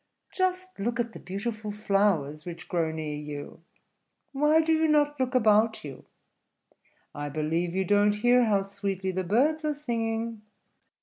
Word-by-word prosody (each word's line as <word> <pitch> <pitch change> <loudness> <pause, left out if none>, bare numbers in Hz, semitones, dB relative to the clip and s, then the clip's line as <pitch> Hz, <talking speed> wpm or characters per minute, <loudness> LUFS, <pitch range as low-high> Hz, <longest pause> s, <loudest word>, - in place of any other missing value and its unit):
"Just 370 0 0
look 230 +4 -2
at 235 -1 -1
the - - -9
beautiful 215 +3 -5
flowers 195 -8 +1
which 170 0 -8
grow 170 -3 0
near 155 -1 -4
you; 150 +1 -7 0.7
why 300 +3 +3
do 320 0 +2
you 320 0 +3
not 295 -1 +2
look 255 0 -1
about 220 -1 +3
you? 140 -3 -9 1.1
I 145 0 -4
believe 160 +4 -1
you 190 0 +1
don't 205 +2 +3
hear 245 +3 +4
how 200 -3 +2
sweetly 195 -1 -3
the 185 0 -2
birds 280 - +2
are 300 -1 0
singing. 230 -5 -3
210 Hz, 150 wpm, -27 LUFS, 175-250 Hz, 1.1 s, hear